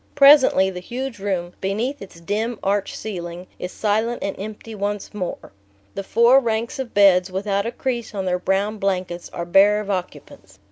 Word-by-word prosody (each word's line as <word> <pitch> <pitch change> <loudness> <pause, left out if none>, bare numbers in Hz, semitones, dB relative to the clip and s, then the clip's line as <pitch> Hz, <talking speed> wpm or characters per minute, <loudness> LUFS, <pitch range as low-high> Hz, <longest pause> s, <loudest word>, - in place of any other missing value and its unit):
Presently 275 -9 +6
the 180 - -6
huge 245 +4 -5
room, 180 -3 -2
beneath 225 +9 -2
its 190 -4 -11
dim 215 +6 -2
arched 200 0 0
ceiling, 175 -4 -6
is 180 - -5
silent 220 +3 -1
and 200 - -2
empty 215 +2 -7
once 205 0 -4
more. 185 -4 -5 0.4
The - - -4
four 235 +6 +5
ranks 230 0 -2
of 260 -3 -5
beds, 190 -2 +5
without 200 +2 -1
a - - -2
crease 240 -3 -4
on 195 -1 -2
their 180 -1 0
brown 200 +3 -1
blankets, 185 -3 -2
are 170 - -5
bare 200 +4 +5
of 205 -1 -4
occupants. 145 - -6
200 Hz, 175 wpm, -22 LUFS, 185-225 Hz, 0.4 s, Presently